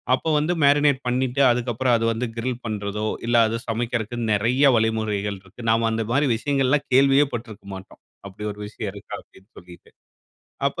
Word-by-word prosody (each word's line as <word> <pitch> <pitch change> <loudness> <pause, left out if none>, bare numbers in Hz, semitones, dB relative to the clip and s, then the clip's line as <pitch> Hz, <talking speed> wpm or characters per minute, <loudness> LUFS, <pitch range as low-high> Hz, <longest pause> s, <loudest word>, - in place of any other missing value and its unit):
அப்போ 160 - -4
வந்து 155 +4 0
மேரினேட் 145 -1 +4
பண்ணிட்டு 130 +2 0
அதக்கப்புறம் 120 +1 +1
அது 115 - -1
வந்து 120 +2 -3
கிரில் 125 +1 -3
பண்றதோ! 105 -1 -3 0.2
இல்ல 120 - +1
அது 115 - -2
சமைக்கிறக்கு 115 0 -2 0.2
நிறைய 125 +7 +3
வழிமுறைகள் 110 -2 -1
இருக்கு. 95 +6 -14
நாம 115 0 +2
அந்த 110 0 -1
மாதிரி 140 +4 +2
விஷயங்கள் 135 +2 +1 0.2
கேள்வியே 135 +2 +5
பட்டுருக்க 110 -4 -7
மாட்டோம். 95 0 -12 0.3
அப்பிடி 105 +2 -7
ஒரு 105 - -16
விஷயம் 105 -1 -6
இருக்கா 100 -1 -8
அப்பிடின்னு 95 +3 -23
சொல்லிட்டு. 90 0 -16 0.8
அப்ப - - -8
115 Hz, 160 wpm, -23 LUFS, 105-130 Hz, 0.8 s, கேள்வியே